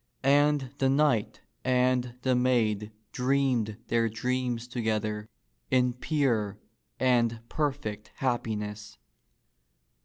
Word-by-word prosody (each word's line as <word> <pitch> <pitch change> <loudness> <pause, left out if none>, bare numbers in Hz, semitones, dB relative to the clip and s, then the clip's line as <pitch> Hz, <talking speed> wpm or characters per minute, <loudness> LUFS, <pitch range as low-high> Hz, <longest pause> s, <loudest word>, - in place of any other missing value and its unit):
And 145 -1 +3
the 135 - +3
knight 135 -6 +2 0.2
and 125 -1 +2
the 130 - +3
maid 110 -4 +1 0.2
dreamed 125 -5 +1
their 115 0 +2
dreams 125 +1 -2
together 110 -3 -2 0.4
in 125 -1 +3
pure 120 -7 0 0.4
and 120 -3 +2
perfect 135 -9 -2
hap 125 -3 0
piness. 105 -1 -5
125 Hz, 95 wpm, -28 LUFS, 110-130 Hz, 0.4 s, And